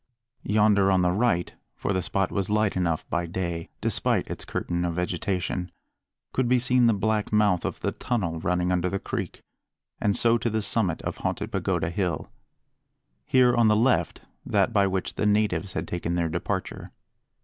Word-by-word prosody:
Yonder 105 -2 +3
on 95 -2 +3
the 90 - +3
right 95 -3 +1 0.2
for 100 - -2
the 95 - 0
spot 95 +2 -1
was 100 -1 -1
light 105 -1 +1
enough 85 -3 -1
by 85 0 0
day, 85 -1 -4
despite - - 0
its - - -6
curtain 85 0 -2
of 85 -1 -1
vegetation 90 0 -2 0.6
could 130 -2 +1
be 125 - +5
seen 125 0 +3
the 115 - +4
black 105 +1 0
mouth 105 -4 +3
of - - -4
the - - 0
tunnel 95 -10 -2
running 90 +1 0
under 90 0 +1
the 100 - -1
creek, - - -5 0.6
and 100 -1 +1
so 115 0 +4
to 115 - -1
the 110 -1 -1
summit 100 -5 0
of - - -4
Haunted - - -3
Pagoda - - -1
Hill; 90 -1 -2 1.0
here, 125 -1 +4
on 120 -1 +4
the 105 - +4
left, 125 +4 +1 0.2
that - - +1
by 100 -1 +4
which 95 -1 -2
the 105 - 0
natives 105 -3 +1
had 80 +2 -3
taken 85 0 -2
their 85 -1 0
departure. - - -4
95 Hz, 180 wpm, -26 LUFS, 90-110 Hz, 1.0 s, be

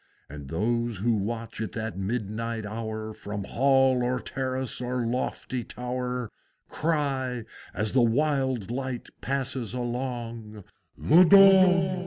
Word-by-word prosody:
And 70 -1 -9
those 115 +5 -1
who 115 +5 +1
watch 115 +2 -3
at 110 - -4
that 110 -1 -4
midnight 110 +2 -3
hour 110 0 -5
From 105 -1 -6
Hall 135 +2 +3
or 125 +1 0
Terrace 130 0 -3
or 125 -1 -2
lofty 125 +1 -2
Tower, 125 -1 -4 0.4
Cry, 135 -6 -1 0.3
as 105 +3 -1
the 130 - +3
wild 130 -2 +1
light 130 -1 -4
passes 130 -4 -3
along, 120 -4 -4 0.3
"The 170 +5 +6
Dong! 185 -1 +6
120 Hz, 120 wpm, -27 LUFS, 110-130 Hz, 0.4 s, The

